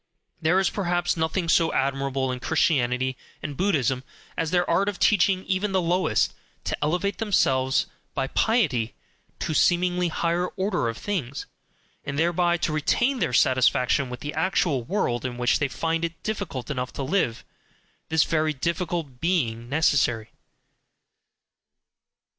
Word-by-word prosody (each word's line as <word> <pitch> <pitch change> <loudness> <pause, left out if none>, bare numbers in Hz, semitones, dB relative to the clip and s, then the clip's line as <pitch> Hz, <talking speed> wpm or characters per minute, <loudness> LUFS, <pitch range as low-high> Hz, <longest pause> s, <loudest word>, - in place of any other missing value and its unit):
There 170 +4 +3
is 195 - +1
perhaps 175 -3 0
nothing 160 +2 -1
so 165 0 +3
admirable 135 -1 0
in 125 - -4
Christianity 130 -4 +1 0.3
and 145 -2 -4
Buddhism 135 - +1 0.3
as 165 - -1
their 175 +1 +1
art 190 +4 +2
of 200 - -5
teaching 190 -1 +3
even 195 +1 -1
the 190 - +3
lowest 175 -9 +1 0.3
to - - -2
elevate 180 +6 0
themselves 130 - +2 0.3
by - - 0
piety 140 - +1 0.5
to - - -1
a - - -1
seemingly 180 +2 +2
higher 170 +2 0
order 190 - 0
of 115 - -5
things, 160 -11 -3 0.6
and 140 - -4
thereby 175 +2 +2
to 155 - -2
retain 240 - +1
their - - 0
satisfaction 130 +2 +3
with 125 -1 -7
the 145 - -4
actual 160 -4 +1
world 120 - -1
in 125 -1 -4
which 120 0 +2
they 145 - +1
find 165 +4 -2
it 165 -1 -4
difficult 195 - -4
enough 125 -2 -3
to 140 - -4
live 130 -6 0 0.6
this 160 -1 +4
very 155 -1 0
difficulty 170 +1 -2
being 120 -10 0
necessary. 135 -7 +1
160 Hz, 145 wpm, -25 LUFS, 130-180 Hz, 0.6 s, this